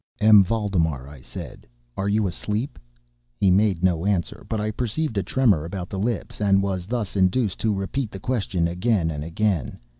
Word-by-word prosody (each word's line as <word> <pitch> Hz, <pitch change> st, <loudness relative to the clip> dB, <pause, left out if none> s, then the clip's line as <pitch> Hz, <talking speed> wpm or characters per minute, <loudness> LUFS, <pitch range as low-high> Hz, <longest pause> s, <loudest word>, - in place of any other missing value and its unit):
"M. 105 Hz, -1 st, +8 dB
Valdemar," 90 Hz, -, 0 dB
I 70 Hz, -2 st, -12 dB
said, -, -, -9 dB, 0.3 s
"are 100 Hz, +1 st, -1 dB
you 105 Hz, +1 st, +2 dB
asleep?" 105 Hz, -, -3 dB, 0.6 s
He 95 Hz, -2 st, +3 dB
made 95 Hz, -2 st, +2 dB
no 90 Hz, -3 st, +2 dB
answer, 95 Hz, -5 st, -1 dB
but 110 Hz, -, -1 dB
I 105 Hz, +1 st, -1 dB
perceived 120 Hz, +4 st, -2 dB
a -, -, +1 dB
tremor 105 Hz, -, +2 dB
about 90 Hz, +1 st, -5 dB
the 95 Hz, -, -3 dB
lips, 110 Hz, 0 st, -3 dB
and 100 Hz, -1 st, +4 dB
was 95 Hz, -2 st, -2 dB
thus 115 Hz, -3 st, -3 dB
induced 95 Hz, +2 st, +2 dB
to 110 Hz, -, +1 dB
repeat 105 Hz, +6 st, -2 dB
the 95 Hz, -, -8 dB
question, 100 Hz, -7 st, 0 dB
again 90 Hz, -1 st, +1 dB
and 75 Hz, -1 st, -4 dB
again. 85 Hz, 0 st, -1 dB
100 Hz, 180 wpm, -24 LUFS, 90-110 Hz, 0.6 s, M